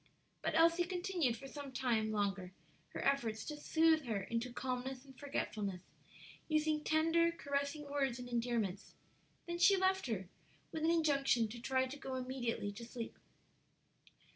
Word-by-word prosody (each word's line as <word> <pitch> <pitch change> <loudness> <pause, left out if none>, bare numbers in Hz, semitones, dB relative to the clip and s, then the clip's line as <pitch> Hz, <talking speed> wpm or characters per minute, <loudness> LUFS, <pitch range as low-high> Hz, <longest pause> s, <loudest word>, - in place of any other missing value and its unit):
But - - -1
Elsie 335 +2 +5
continued 355 - 0
for 270 - -9
some 280 0 -7
time 235 -4 +1
longer 195 -3 -1 0.3
her - - -5
efforts 235 -6 +1
to 300 - -4
soothe 315 0 +3
her 215 -4 -1
into 235 +4 -2
calmness 255 +1 -3
and 270 -1 -14
forgetfulness, 210 -9 -3 0.6
using 310 -1 +1
tender, 330 +2 +3
caressing 285 -1 -2
words 275 -4 0
and 250 -1 -7
endearments; 230 -5 -1 0.5
then 345 0 -3
she 395 +2 +7
left 380 -3 +2
her, 195 -6 -2 0.4
with 315 - -3
an 325 - +4
injunction 280 -8 +3
to 235 +2 -7
try 260 +1 +2
to 270 +3 -7
go 265 -1 -4
immediately 250 -5 -2
to 210 +4 -9
sleep. 235 0 -7
265 Hz, 150 wpm, -36 LUFS, 235-315 Hz, 0.6 s, she